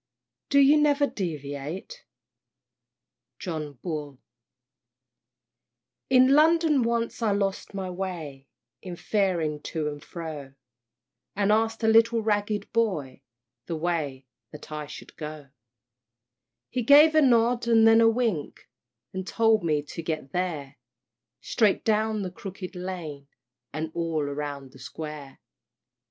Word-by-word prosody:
"Do 280 - +3
you 285 +2 +6
never 290 -1 +3
deviate?" 165 - -6 1.3
John 155 -5 -5
Bull. 150 -5 -5 1.9
In 255 0 +6
London 315 -1 +4
once 235 0 -1
I 220 -2 +2
lost 200 0 -2
my 190 -1 -3
way 165 -8 -6 0.3
In 180 -2 -7
faring 170 -7 0
to 155 -1 -3
and 145 -1 -6
fro, 150 -5 -8 0.8
And 200 0 +2
ask'd 225 +1 +1
a - - +3
little 225 +1 +4
ragged 210 -1 -1
boy 170 - -1 0.5
The 165 - -2
way 155 -5 -2 0.3
that 150 - -12
I 150 -1 -5
should 150 - -11
go; 150 -2 -8 1.2
He 255 - -1
gave 290 +6 +7
a 310 - +5
nod, 240 -2 +3
and 225 -1 +5
then 225 0 +6
a 225 - +6
wink, 225 -10 -2 0.5
And 190 0 -5
told 225 -2 +3
me 150 -3 +1
to 165 - -7
get 155 -4 -4
there 150 -6 -3 0.6
"Straight 210 -4 +1
down 215 -1 +1
the 185 - -4
Crooked 190 0 -8
Lane, 170 -6 -6 0.4
And 155 +1 -4
all 165 -3 -1
round 140 -2 -5
the 135 - -16
Square." 150 -2 -8
185 Hz, 125 wpm, -26 LUFS, 150-225 Hz, 1.9 s, gave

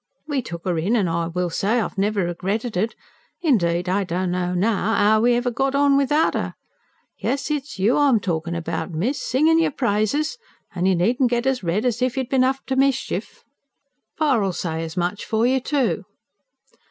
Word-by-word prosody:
We 285 -3 -1
tuck 170 -7 -8
'er 175 -3 0
in, 195 +9 +1
an', 205 -6 +2
I 165 0 -1
will 175 +1 -2
say, 210 +8 +1
I've 225 - -3
never 200 -1 0
regretted 195 +6 -3
it. 215 +6 -1 0.5
Indeed 175 - +2
I 195 +2 +1
don't 180 0 -2
know 180 0 -1
now, 215 +3 +1
'ow 215 +1 +4
we 240 +1 +4
ever 245 +1 0
got 270 +3 0
on 280 0 +4
without 280 +3 +2
'er. - - -3 0.6
Yes, 275 +2 -2
it's 290 -5 -3
you 205 +6 +2
I'm 280 -6 +4
talkin' 170 -3 -2
about, 170 +3 -3
miss, 200 - -2
singin' 315 +6 +3
yer 330 - +3
praises, 265 - 0 0.3
an' 185 -1 0
you 190 - +3
needn't 240 +9 +2
get 240 0 0
as 265 -1 +1
red 185 +7 0
as 240 -1 0
if 255 +1 0
you'd 260 -2 -2
bin 260 -1 +3
up 265 +1 0
to 265 - -2
mischief! 270 0 -1 0.7
Pa'll 240 - +2
say 165 -2 -3
as 165 +2 -7
much 180 +3 -1
for 220 +1 0
you, 260 +2 +3
too." 270 0 -1
220 Hz, 190 wpm, -22 LUFS, 180-265 Hz, 0.7 s, ow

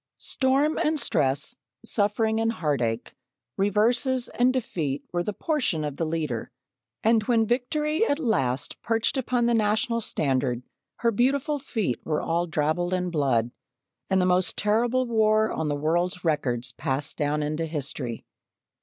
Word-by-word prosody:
Storm 275 +4 +1
and 305 0 +1
stress, 145 - +1 0.3
suffering 220 +1 +1
and 225 0 +1
heartache, 130 - -1 0.4
reverses 235 +6 +2
and 245 +1 +2
defeat 160 - -2
were 175 - +1
the 190 - -2
portion 225 - -1
of 145 -2 -4
the 165 - -1
Leader, 155 -8 -2 0.6
and 225 0 +4
when 230 -1 +3
Victory 300 - 0
at 285 - +1
last 135 - -1
perched 225 +2 +1
upon 250 -2 +1
the 240 - +3
National 220 +1 +1
standard, 130 - 0 0.4
her 235 - +3
beautiful 275 +6 +1
feet 220 - -2
were 155 -1 -1
all 170 +1 0
drabbled 160 +3 0
in 180 -1 -2
blood, 130 -7 +1 0.6
and 190 -1 +3
the 180 - +3
most 180 0 +2
terrible 235 +5 +2
war 220 -2 +2
on 160 - -1
the 145 - 0
world's 175 +5 0
records 125 -6 0
passed 135 +3 -3
down 150 0 0
into 155 +2 -2
history. 135 -6 -4
185 Hz, 145 wpm, -26 LUFS, 150-235 Hz, 0.6 s, and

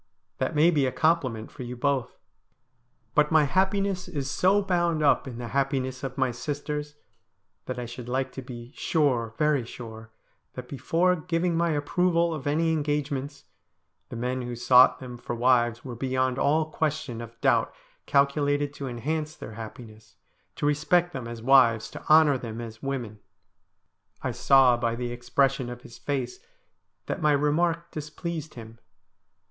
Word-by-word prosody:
That - - -1
may 160 +4 +5
be 145 -5 +2
a - - -1
compliment 130 -6 0
for - - -10
you 125 0 -5
both. 135 -1 -1 1.0
But 150 +3 +3
my 160 -1 +5
happiness 190 +4 0
is 140 -6 -4
so 200 +3 +3
bound 175 -4 +1
up 140 -1 +3
in 120 -3 -7
the 120 -1 -6
happiness 135 -1 -1
of 135 0 -5
my 130 -2 +1
sisters, 150 +3 -4 0.7
that - - -4
I 125 - -4
should 120 +1 -8
like 130 +1 -1
to 135 - -7
be 120 -1 -9
sure 130 -11 0
— - - -31
very 150 -4 +2
sure 110 -2 -10 0.2
— - - -45
that, 125 -1 -7
before 170 +7 +1
giving 170 +1 -1
my 170 +1 +2
approval 170 +3 +1
of 150 -2 -5
any 160 +3 +2
engagements, 145 -2 -2 0.7
the - - -7
men 125 +2 -2
who 120 0 -5
sought 125 +2 +6
them 125 -2 -9
for 120 - -4
wives 120 -1 +2
were 125 - -5
beyond 130 +1 0
all 155 +2 +2
question 150 -7 -2
of 115 0 -11
doubt - - +2 0.4
calculated 145 0 +2
to 140 -1 -6
enhance 155 +5 -3
their 110 - -9
happiness, 110 0 -10 0.4
to - - -3
respect 170 +4 +2
them 130 -5 -5
as 115 -1 -8
wives, 120 -4 +4
to - - -8
honour 155 -3 +6
them 115 -2 -6
as 110 -1 -8
women.' 125 -6 -4 1.0
I - - -1
saw 130 -3 +5
by 115 -1 -1
the 120 0 -4
expression 130 +1 0
of 120 0 -8
his 115 - -13
face 145 - -3 0.7
that - - -4
my 150 -1 +4
remark 165 +4 +1
dis 150 -1 -6
pleased 160 0 -5
him. 115 -1 -11
135 Hz, 165 wpm, -26 LUFS, 120-155 Hz, 1.0 s, sought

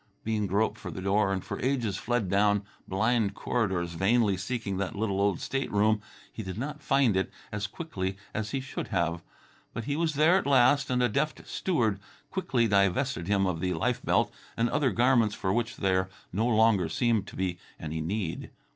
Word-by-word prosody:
Bean 105 -2 0
groped 100 +4 0
for 90 - -6
the 85 - -6
door 100 +1 +2
and 95 -2 -2
for - - -5
ages 125 -6 0
fled 120 -2 -1
down 100 +1 +3 0.2
blind 105 +1 +1
corridors, 95 -8 -1
vainly 100 +3 +3
seeking 100 0 -3
that 100 -1 -2
little 100 -2 0
old 100 -3 +2
stateroom. 110 -5 +1 0.3
He - - -5
did 95 -2 -6
not 150 +5 -4
find 130 -7 +3
it 95 - 0 0.2
as 105 -1 -2
quickly 95 - -4 0.2
as 110 -1 -2
he 135 - -2
should 130 - -5
have; 85 -3 0 0.5
but 115 - -3
he 140 +5 -2
was 160 -1 0
there 160 +5 +5
at 190 - -1
last, 140 +1 +4
and 125 -1 +2
a - - +5
deft 140 +7 -2
steward 115 - 0 0.3
quickly 135 -11 +1
divested 100 +1 +1
him 100 -1 +2
of 90 -3 -1
the 90 +1 -1
life 80 - 0
belt - - +2 0.2
and 115 +1 +1
other 145 -2 +2
garments 120 -3 +3
for 95 0 -1
which 120 +2 -1
there 95 -1 +1 0.2
no 110 +5 +1
longer 110 -7 +3
seemed 115 +3 +1
to - - -10
be 90 -2 -2 0.2
any 80 0 -4
need. 90 +1 -3
105 Hz, 190 wpm, -28 LUFS, 95-125 Hz, 0.5 s, there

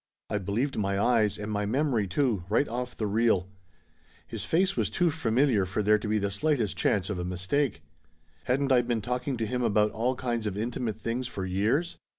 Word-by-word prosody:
I 105 - +1
believed 110 +8 -1
my 100 -1 0
eyes, 110 -2 +2
and 105 +1 -5
my 105 -1 -1
memory, 125 -3 +1
too, 110 -2 0
right 145 - +2
off 125 +1 -4
the 110 - -1
reel. 105 -3 +2 0.8
His 110 -4 -6
face 185 - +2
was - - 0
too 175 -2 +1
familiar 125 -6 +2
for 95 +3 -1
there 105 +1 +4
to 105 - -5
be 110 +1 +1
the 100 -1 -1
slightest 110 - 0
chance 100 0 +1
of 95 - -3
a - - -2
mistake. 90 +11 -1 0.6
Hadn't 135 +2 +1
I 125 -2 +6
been 120 -2 -1
talk 125 +3 -3
ing 135 -3 -1
to 115 - -1
him 125 +4 -2
about 105 -2 +2
all 120 +4 0
kinds 120 -3 -2
of 100 -1 -3
intimate 115 -1 -3
things 120 +3 -2
for 95 -6 -5
years 110 - 0
115 Hz, 205 wpm, -28 LUFS, 105-125 Hz, 0.8 s, I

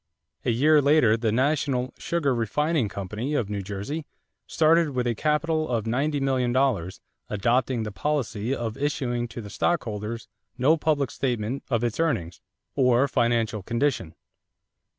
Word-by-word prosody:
A - - 0
year 145 +6 +4
later 140 -6 +4
the 115 -1 0
National 130 0 0
Sugar 160 -6 0
Refining 125 +3 0
Company, 105 +9 -4
of 110 -7 -1
New 100 -1 -2
Jersey, 100 - -5 0.4
started 160 -2 +3
with 125 -1 0
a 120 - +1
capital 155 +4 0
of 115 -3 -1
$90,000,000, 130 - 0 0.3
adopting 120 +3 +1
the 105 - -4
policy 120 -3 -2
of 115 -4 -3
issuing 125 -4 -1
to 120 - -7
the 105 - -9
stockholders 110 -7 -2 0.3
no 140 +5 +4
public 150 -4 0
statement 120 0 -2
of 120 -3 +1
its 120 +2 -1
earnings 110 - -1 0.3
or 125 0 +3
financial 115 -4 +1
condition. 115 - -1
125 Hz, 135 wpm, -25 LUFS, 110-145 Hz, 0.4 s, year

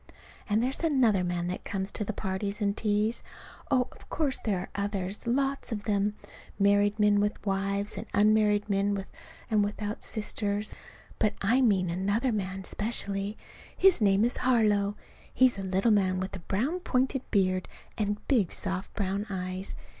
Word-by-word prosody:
And 215 +3 +2
there's 260 +2 0
another 245 - +3
man 175 -1 -1
that 180 - -4
comes 195 0 -2
to - - -2
the 210 - -2
parties 200 0 -3
and 200 -1 +1
teas; 215 +1 0 0.5
oh, 250 -1 +3
of - - -17
course 285 -4 0
there 205 -4 +1
are 180 - -5
others, 200 +1 -3
lots 275 +2 0
of 210 -2 -3
them, 205 -1 +1 0.4
married 205 +1 +3
men 210 -1 +4
with 210 +1 -1
wives, 200 +1 -1
and - - -7
unmarried 210 0 +3
men 200 0 +1
with 195 -1 -4 0.5
and 210 -1 +4
without 210 +1 -3
sisters. 210 -1 -2 0.5
But 215 - +2
I 235 +7 +4
mean 190 -7 +3
another 200 +8 0
man 190 -2 -3
specially. 200 0 -2 0.4
His 385 -8 +5
name 200 +1 +4
is 240 - -1
Harlow. 210 -5 +2 0.4
He's 255 -5 +3
a - - -2
little 190 +4 +1
man 190 -3 +2
with 190 +1 -4
a - - -6
brown 240 - -1
pointed 265 -4 0
beard 185 -2 +1 0.3
and 210 -1 -2
big 220 -10 +2
soft 190 -1 -4
brown 200 +1 -1
eyes. 185 0 -4
205 Hz, 165 wpm, -29 LUFS, 195-220 Hz, 0.5 s, His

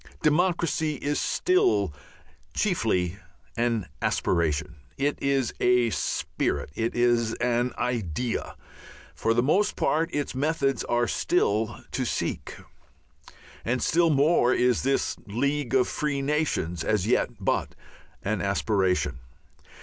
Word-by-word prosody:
Democracy 160 -1 +1
is 145 +2 -2
still 370 +1 +2 0.6
chiefly 100 - 0 0.4
an 115 -4 0 0.2
aspiration, 80 -2 0 0.2
it 145 +1 +1
is 135 -3 +1
a 125 -2 +3
spirit, 80 - -2
it 115 +8 -2
is 120 -2 +2
an 120 +1 0
idea; 120 -1 -2 0.6
for 115 - 0
the 120 - +3
most 195 +10 +2
part 160 +2 +1
its 145 -1 -2
methods 135 -2 0
are 120 0 +1
still 110 +2 0
to - - -1
seek. - - -3 1.1
And 125 +2 0
still 170 +5 +3
more 145 -3 +4
is 125 -1 +2
this 135 +1 0
"League 140 +4 -1
of 125 -1 +4
Free 140 -2 -2
Nations" 140 - -1
as 105 -3 +1
yet 120 - +2
but - - -1 0.5
an 100 -1 -1
aspiration. 95 - 0
125 Hz, 115 wpm, -26 LUFS, 110-145 Hz, 1.1 s, more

